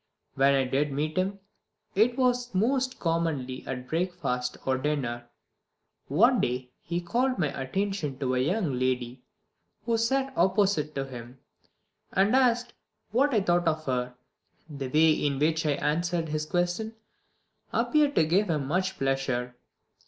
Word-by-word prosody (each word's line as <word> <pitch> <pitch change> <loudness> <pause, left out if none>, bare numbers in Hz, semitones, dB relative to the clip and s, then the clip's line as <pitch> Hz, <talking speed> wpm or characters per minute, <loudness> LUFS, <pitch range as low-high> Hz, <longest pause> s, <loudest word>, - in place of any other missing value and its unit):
When 140 +1 +4
I 135 - +3
did 140 +3 0
meet 150 +3 -2
him 190 +2 0 0.6
it 225 +5 +3
was 245 -3 +1
most 255 +6 +1
commonly 160 -7 -1
at 125 -1 -5
breakfast 160 -8 -2
or 130 -1 +1
dinner. 120 -5 -2 0.8
One 235 - +4
day 125 +1 -2
he 175 +1 -3
called 250 +9 0
my 155 -5 +1
attention 150 +1 -2
to 130 -2 -1
a 125 - +1
young 150 - 0
lady 125 -1 -1 0.6
who 230 -1 +1
sat 265 +3 0
opposite 190 -5 +2
to 135 -1 -2
him, 125 -1 -10 0.8
and 200 +6 +3
asked 245 -2 +2 0.4
what 270 +6 +3
I 220 -5 +3
thought 175 -2 +1
of 155 -1 0
her. 125 -1 -2 0.5
The 140 -4 -5
way 155 +4 +4
in 145 -2 0
which 160 +2 +1
I 145 - +3
answered 165 +3 -1
his 155 0 -2
question 180 +7 -1 0.8
appeared 295 -2 +2
to 160 - +4
give 185 +5 +2
him 150 -4 0
much 185 +6 -1
pleasure. 135 -2 -1
160 Hz, 145 wpm, -27 LUFS, 135-200 Hz, 0.8 s, When